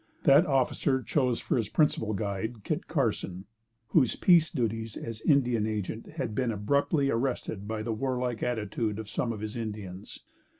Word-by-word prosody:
That 150 +5 +6
officer 130 -1 +1
chose 125 -5 +1
for - - 0
his 110 -3 -1
principal 110 -7 +1
guide 105 +2 -3
Kit 155 - -2
Carson, 105 - -1 0.4
whose 135 -8 +3
peace 170 -3 +5
duties 115 -2 -2
as 115 -2 -6
Indian 125 -7 +3
Agent 110 +1 -4
had 110 - -3
been 125 0 0
abruptly 140 +7 +1
arrested 115 -4 -2
by 110 0 -3
the 115 0 -2
warlike 125 0 -2
attitude 110 -2 -1
of 110 -1 -6
some 115 - -1
of 110 -2 -5
his 110 0 -5
Indians. 105 -5 -6
115 Hz, 160 wpm, -29 LUFS, 110-135 Hz, 0.4 s, That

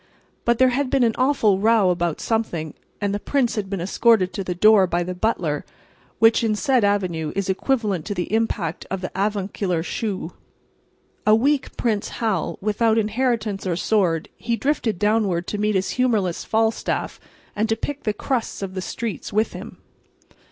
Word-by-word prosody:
But 235 0 +3
there 260 +1 +5
had 265 +1 0
been 270 -2 +2
an 230 -2 +3
awful 250 -7 +2
row 215 -3 +4
about 175 -2 -1
something, 175 -9 -2 0.3
and 205 -1 -1
the 205 - -1
prince 255 0 0
had 205 -3 -3
been 195 -2 -3
escorted 190 +1 +2
to 195 - -3
the 180 -1 -3
door 205 0 +6
by 175 0 0
the 180 +1 -4
butler, 180 -6 -1 0.5
which, 225 +1 +4
in 220 -2 +1
said 260 0 +2
avenue, 180 -6 0
is 195 -1 0
equivalent 205 - 0
to 205 - -3
the 180 +3 -3
impact 215 -7 -1
of 190 -1 -3
the 185 - -4
avuncular 195 -3 -1
shoe. 190 -3 -4 0.9
A 215 - +7
weak 275 +5 0
Prince 215 -3 0
Hal, 215 -8 -1
without 220 +2 +2
inheritance 220 -3 0
or 175 - 0
sword, 175 -4 +1
he 235 0 -1
drifted 245 - 0
downward 205 -4 +1
to 205 - -4
meet 210 0 +1
his 190 0 0
humorless 220 -9 0
Falstaff, 225 0 -1 0.4
and 220 +2 0
to 225 - +2
pick 285 +5 -5
the 215 - 0
crusts 230 -1 -3
of 190 -1 -5
the 185 - -3
streets 220 - -5
with 215 +2 +1
him. - - -9
210 Hz, 175 wpm, -22 LUFS, 185-230 Hz, 0.9 s, A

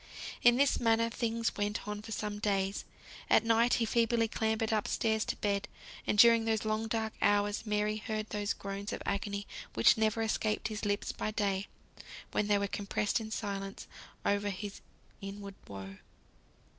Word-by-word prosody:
In 240 0 +7
this 280 +1 +3
manner 230 0 +3
things 230 0 -1
went 205 +1 -2
on 210 0 -4
for 225 - -9
some 210 -1 -3
days. 195 -1 0 0.4
At - - +5
night 230 +1 +4
he 230 - +1
feebly 230 0 +2
clambered 220 0 0
up 215 -2 +1
stairs 220 -1 +1
to - - -2
bed; 205 -1 -1 0.4
and 210 - +1
during 230 0 +7
those 220 -1 0
long 215 +1 0
dark 220 -1 -1
hours 205 +2 +2
Mary 210 0 +1
heard 215 0 -3
those 205 -1 -1
groans 200 +1 -5
of - - -5
agony 200 0 -2 0.3
which 115 - +6
never 220 +1 +2
escaped 220 0 0
his 215 0 -4
lips 205 0 0
by - - -3
day, 200 -2 -1 0.6
when 210 - 0
they 205 -1 +4
were 200 - 0
compressed 205 +2 -1
in 220 -1 -6
silence 195 -2 -4 0.4
over 205 0 +1
his 200 +1 -6 0.4
inward 200 0 -7
woe. 95 -1 -8
210 Hz, 170 wpm, -32 LUFS, 200-225 Hz, 0.6 s, In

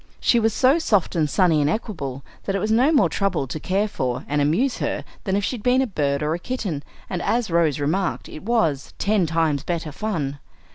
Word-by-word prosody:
She 235 - +3
was 225 0 +2
so 265 +8 +4
soft 205 - +1
and 155 -3 +1
sunny 165 -3 +3
and 145 - +2
equable, 140 - -4 0.2
that 195 - -1
it - - +1
was 215 +3 -1
no 250 +7 +4
more 290 - +5
trouble 195 -8 0
to 145 +4 -5
care 195 +6 0
for 125 -10 -3
and 145 0 +1
amuse 190 - +1
her - - -2 0.2
than 190 -2 0
if 200 - 0
she 250 - -1
had - - -10
been 250 +3 +3
a - - +1
bird 145 - -1
or 150 +1 0
a 170 - -3
kitten; 195 - -3 0.3
and, 180 -2 -3
as 235 -5 0
Rose 165 -4 +2
remarked, 170 +6 -1
it 155 - -9
was 195 - 0
"ten 200 -4 +2
times 160 -3 +1
better 165 0 -3
fun." 150 -7 -3
180 Hz, 225 wpm, -23 LUFS, 150-215 Hz, 0.3 s, more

